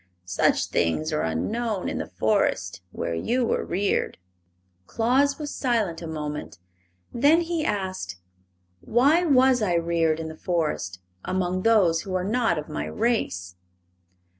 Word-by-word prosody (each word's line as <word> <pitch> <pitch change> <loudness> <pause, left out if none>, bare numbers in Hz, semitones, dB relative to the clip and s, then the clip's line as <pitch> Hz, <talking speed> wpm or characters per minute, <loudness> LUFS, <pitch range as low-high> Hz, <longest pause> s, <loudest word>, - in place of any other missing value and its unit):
Such 90 - +2
things 155 - 0
are 150 - +1
unknown 210 - -2
in - - -2
the - - -4
Forest - - 0
where - - -3
you 240 - 0
were - - 0
reared." 195 +3 -1 0.7
Claus 265 +5 +2
was 295 -2 -5
silent 220 - 0
a 165 - -6
moment. 150 - -5 0.6
Then 290 +7 +4
he 335 -2 -2
asked: 185 - -2 0.6
"Why 280 - +3
was 260 -5 +4
I 185 -5 +1
reared 165 -1 +1
in 160 - -4
the 160 - -7
forest, 155 - -2 0.2
among 185 0 -1
those 190 -7 +4
who 190 -1 -5
are 185 - 0
not 220 -3 +1
of 150 - -4
my 155 - -4
race?" 95 - -1
185 Hz, 140 wpm, -25 LUFS, 160-240 Hz, 0.7 s, Then